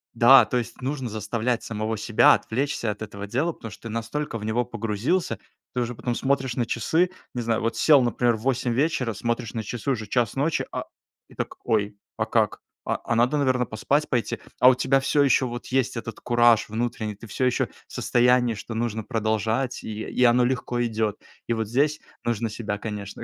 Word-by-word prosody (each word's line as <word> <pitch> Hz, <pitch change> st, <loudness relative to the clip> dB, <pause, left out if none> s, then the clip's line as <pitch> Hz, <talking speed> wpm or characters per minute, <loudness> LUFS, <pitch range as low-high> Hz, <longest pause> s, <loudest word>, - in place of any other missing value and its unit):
Да, 120 Hz, +1 st, +8 dB
то 125 Hz, -, -4 dB
есть 120 Hz, +1 st, -5 dB
нужно 130 Hz, -2 st, -3 dB
заставлять 110 Hz, +3 st, -1 dB
самого 110 Hz, 0 st, -3 dB
себя 110 Hz, +1 st, +5 dB
отвлечься 125 Hz, -2 st, -1 dB
от 105 Hz, -, -4 dB
этого 100 Hz, -1 st, -6 dB
дела, 140 Hz, +10 st, 0 dB
потому 115 Hz, -, -9 dB
что 105 Hz, -, -13 dB
ты 115 Hz, -, -6 dB
настолько 115 Hz, +4 st, -3 dB
в 105 Hz, -, -6 dB
него 115 Hz, +3 st, +1 dB
погрузился. 115 Hz, -, -1 dB, 0.3 s
Ты 125 Hz, -, 0 dB
уже 120 Hz, +1 st, -2 dB
потом 120 Hz, +1 st, -3 dB
смотришь 135 Hz, -3 st, 0 dB
на 120 Hz, -, 0 dB
часы. 160 Hz, +12 st, +1 dB, 0.2 s
Не 125 Hz, -, -2 dB
знаю, 115 Hz, -1 st, 0 dB
вот 115 Hz, 0 st, -1 dB
сел, 145 Hz, +4 st, +6 dB
например, 120 Hz, -1 st, +2 dB
в -, -, -12 dB
8 130 Hz, -2 st, 0 dB
вечера, 130 Hz, -3 st, 0 dB
смотришь 115 Hz, +1 st, -3 dB
на 115 Hz, -, -2 dB
часы, 120 Hz, +6 st, -3 dB
уже 110 Hz, -5 st, -3 dB
час 120 Hz, 0 st, 0 dB
ночи, 150 Hz, +4 st, 0 dB
а, -, -, -4 dB, 0.4 s
и -, -, -17 dB
так: -, -, -4 dB
"Ой, 105 Hz, -2 st, 0 dB, 0.2 s
а -, -, -1 dB
как? -, -, +1 dB, 0.2 s
А -, -, 0 dB
а 115 Hz, -, -1 dB
надо 120 Hz, +5 st, +3 dB
наверно 130 Hz, -3 st, +2 dB
поспать 130 Hz, +8 st, 0 dB
пойти?" 120 Hz, -4 st, -1 dB, 0.2 s
А 125 Hz, -, +9 dB
у 130 Hz, -, +4 dB
тебя 130 Hz, +2 st, +2 dB
всё 145 Hz, +2 st, +2 dB
еще 135 Hz, -1 st, +3 dB
вот 120 Hz, 0 st, -6 dB
есть 130 Hz, -2 st, 0 dB
этот 115 Hz, -1 st, -6 dB
кураж 120 Hz, -2 st, +4 dB
внутренний, 110 Hz, -1 st, -2 dB
ты 115 Hz, +3 st, -12 dB
всё 130 Hz, -, -3 dB
еще 125 Hz, -, +2 dB, 0.2 s
в -, -, -21 dB
состоянии, 125 Hz, -1 st, +3 dB
что 110 Hz, +2 st, -7 dB
нужно 110 Hz, -1 st, -2 dB
продолжать 110 Hz, +3 st, -1 dB
и 110 Hz, 0 st, -5 dB
и 125 Hz, -, 0 dB
оно 120 Hz, 0 st, +5 dB
легко 125 Hz, -1 st, -1 dB
идет. 110 Hz, -2 st, -1 dB, 0.3 s
И -, -, -2 dB
вот 110 Hz, -2 st, -2 dB
здесь 145 Hz, +6 st, +1 dB, 0.2 s
нужно 115 Hz, -1 st, -1 dB
себя 105 Hz, -2 st, -4 dB
конечно 105 Hz, -2 st, -6 dB
120 Hz, 205 wpm, -25 LUFS, 110-130 Hz, 0.4 s, А